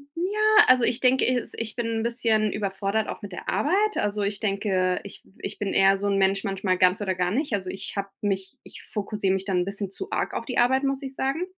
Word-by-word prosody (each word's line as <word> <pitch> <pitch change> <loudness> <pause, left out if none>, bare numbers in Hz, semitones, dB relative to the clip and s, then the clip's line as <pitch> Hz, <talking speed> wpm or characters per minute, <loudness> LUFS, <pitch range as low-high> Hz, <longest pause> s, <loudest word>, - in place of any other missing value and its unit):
ja, 425 +5 +4
also 255 -1 +5
ich 240 +1 +2
denke, 260 0 +3
es 250 -1 0
ich 225 -1 -3
bin 240 -2 -2
'n 225 -1 -1
bisschen 225 -3 +1
überfordert, 200 +1 -1
auch - - -6
mit 205 -2 -8
der 180 - -6
Arbeit. 405 +7 +1
Also, 205 0 -1
ich 200 0 -1
denke, 195 -3 0
ich 200 - -11 0.2
ich - - -6
bin 200 -2 -2
eher 195 0 +5
so 200 +1 -2
'n 200 -1 +1
Mensch, 195 +1 +2
manchmal 195 -2 -1
ganz 185 +2 +3
oder 190 -2 -1
gar 180 0 0
nicht. 275 +2 -1
Also, 190 -2 -1
ich 195 +1 -6
habe 200 0 -2
mich 195 -2 -2
ich - - -13
fokussiere 205 -2 -2
mich 190 0 -2
dann 190 -3 +1
'n 175 - 0
bisschen 200 0 -4
zu - - -6
arg - - -1
auf 230 - -4
die 250 - -4
Arbeit, 260 +3 +3
muss 275 -1 -1
ich 270 -1 -7
sagen. 275 +8 -1
205 Hz, 245 wpm, -25 LUFS, 195-250 Hz, 0.2 s, also